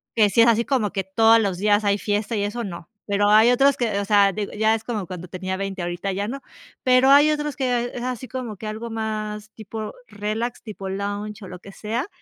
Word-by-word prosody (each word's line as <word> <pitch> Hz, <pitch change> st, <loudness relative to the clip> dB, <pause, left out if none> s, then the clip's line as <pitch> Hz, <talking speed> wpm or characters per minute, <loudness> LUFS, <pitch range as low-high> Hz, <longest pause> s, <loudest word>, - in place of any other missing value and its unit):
que 215 Hz, -2 st, +5 dB
si 215 Hz, +4 st, +4 dB
es 230 Hz, -, +6 dB
así 230 Hz, 0 st, +3 dB
como 250 Hz, -7 st, 0 dB
que 195 Hz, -, -2 dB
todos 225 Hz, +4 st, +4 dB
los 200 Hz, -5 st, -1 dB
días 205 Hz, +1 st, +3 dB
hay 200 Hz, 0 st, +2 dB
fiesta 210 Hz, +2 st, -1 dB
y 205 Hz, -, 0 dB
eso, 220 Hz, +4 st, -3 dB
no. 170 Hz, -4 st, -8 dB, 0.2 s
Pero 205 Hz, 0 st, +1 dB
hay 220 Hz, +3 st, +6 dB
otros 275 Hz, +2 st, +4 dB
que, 220 Hz, -5 st, 0 dB
o 200 Hz, -, -2 dB
sea, 200 Hz, -1 st, +4 dB
digo, 205 Hz, 0 st, -4 dB
ya 220 Hz, +1 st, +2 dB
es 220 Hz, -, -6 dB
como 220 Hz, -5 st, -3 dB
cuando 180 Hz, 0 st, -7 dB
tenía 185 Hz, +1 st, -4 dB
20 195 Hz, -1 st, -4 dB
ahorita 175 Hz, +3 st, -3 dB
ya 200 Hz, +2 st, -2 dB
no. 275 Hz, +4 st, -5 dB, 0.4 s
Pero 255 Hz, +1 st, +5 dB
hay 290 Hz, +2 st, +7 dB
otros 295 Hz, -1 st, -2 dB
que 245 Hz, -3 st, -1 dB
es 245 Hz, -, -5 dB
así 255 Hz, 0 st, -4 dB
como 240 Hz, -3 st, -6 dB
que 215 Hz, -, -9 dB
algo 220 Hz, +2 st, -5 dB
más 215 Hz, -1 st, -4 dB
tipo 215 Hz, 0 st, -7 dB
relax, 215 Hz, +4 st, -4 dB
tipo 200 Hz, -3 st, -7 dB
lounge 205 Hz, +2 st, -4 dB
o -, -, -8 dB
lo 180 Hz, -1 st, -9 dB
que 195 Hz, -, -12 dB
sea. 225 Hz, +8 st, -3 dB
215 Hz, 235 wpm, -23 LUFS, 200-235 Hz, 0.4 s, hay